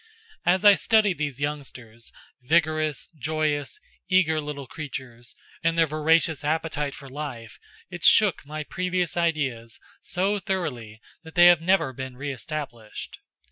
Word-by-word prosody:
As 185 Hz, +3 st, +3 dB
I 205 Hz, -, +10 dB
studied 205 Hz, -1 st, +2 dB
these 145 Hz, -3 st, -3 dB
youngsters, 130 Hz, -6 st, -6 dB, 0.3 s
vigorous, 155 Hz, +1 st, +1 dB
joyous, 155 Hz, -, -2 dB, 0.3 s
eager 160 Hz, -5 st, +3 dB
little 145 Hz, -2 st, -6 dB
creatures, 125 Hz, -4 st, -8 dB, 0.3 s
and 165 Hz, 0 st, +1 dB
their 165 Hz, -, +5 dB
voracious 155 Hz, 0 st, +2 dB
appetite 150 Hz, -2 st, -1 dB
for 140 Hz, -, -11 dB
life, 130 Hz, -5 st, -7 dB, 0.3 s
it 175 Hz, -2 st, -8 dB
shook 205 Hz, -7 st, +5 dB
my 155 Hz, +1 st, -6 dB
previous 180 Hz, +1 st, -2 dB
ideas 140 Hz, -9 st, -1 dB, 0.2 s
so 195 Hz, +3 st, 0 dB
thoroughly 145 Hz, -, -4 dB, 0.2 s
that 160 Hz, -1 st, -13 dB
they 175 Hz, 0 st, +7 dB
have 175 Hz, -2 st, +7 dB
never 180 Hz, -6 st, +2 dB
been 130 Hz, 0 st, -7 dB
re 145 Hz, +2 st, -4 dB
established. 125 Hz, -5 st, -7 dB
155 Hz, 135 wpm, -25 LUFS, 135-170 Hz, 0.3 s, I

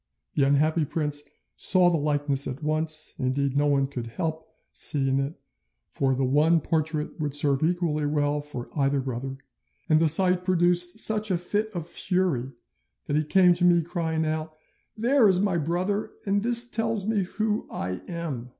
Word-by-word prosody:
The -, -, 0 dB
unhappy 155 Hz, +4 st, +2 dB
prince 150 Hz, -1 st, -1 dB, 0.3 s
saw 180 Hz, -1 st, +4 dB
the 170 Hz, -, +1 dB
likeness 145 Hz, -2 st, 0 dB
at 135 Hz, +3 st, -6 dB
once, 155 Hz, 0 st, 0 dB
indeed 135 Hz, +1 st, -1 dB
no 145 Hz, +1 st, +2 dB
one 140 Hz, -1 st, +2 dB
could 125 Hz, -4 st, -6 dB
help 160 Hz, +5 st, -4 dB, 0.3 s
seeing 135 Hz, -2 st, +1 dB
it, 140 Hz, +4 st, -3 dB, 0.6 s
for 135 Hz, -1 st, 0 dB
the 135 Hz, +1 st, 0 dB
one 150 Hz, +6 st, +3 dB
portrait 155 Hz, 0 st, -2 dB
would 145 Hz, -2 st, -2 dB
serve 140 Hz, -2 st, +2 dB
equally 160 Hz, -3 st, 0 dB
well 145 Hz, 0 st, 0 dB
for 145 Hz, -5 st, -8 dB
either 140 Hz, -1 st, +1 dB
brother, 130 Hz, +1 st, -5 dB, 0.5 s
and 155 Hz, -1 st, +4 dB
the 165 Hz, -, +3 dB
sight 180 Hz, +3 st, +6 dB
produced 175 Hz, +1 st, +2 dB
such 215 Hz, -1 st, +3 dB
a 185 Hz, -, +1 dB
fit 205 Hz, +5 st, -2 dB
of 170 Hz, -3 st, -4 dB
fury 170 Hz, -7 st, -1 dB, 0.5 s
that 145 Hz, -, -2 dB
he 155 Hz, -, +2 dB
came 180 Hz, +3 st, +4 dB
to 175 Hz, +1 st, -3 dB
me 175 Hz, -1 st, +4 dB
crying 160 Hz, -2 st, -2 dB
out, 155 Hz, 0 st, -3 dB, 0.4 s
"There 240 Hz, +1 st, +3 dB
is 185 Hz, -1 st, +2 dB
my 195 Hz, -3 st, +1 dB
brother, 180 Hz, +6 st, -2 dB, 0.2 s
and 200 Hz, 0 st, +1 dB
this 240 Hz, +1 st, +1 dB
tells 225 Hz, -3 st, -1 dB
me 220 Hz, -2 st, +1 dB
who 215 Hz, +3 st, -2 dB
I 90 Hz, +1 st, -5 dB
am!" 155 Hz, -8 st, -5 dB
155 Hz, 170 wpm, -25 LUFS, 145-180 Hz, 0.6 s, sight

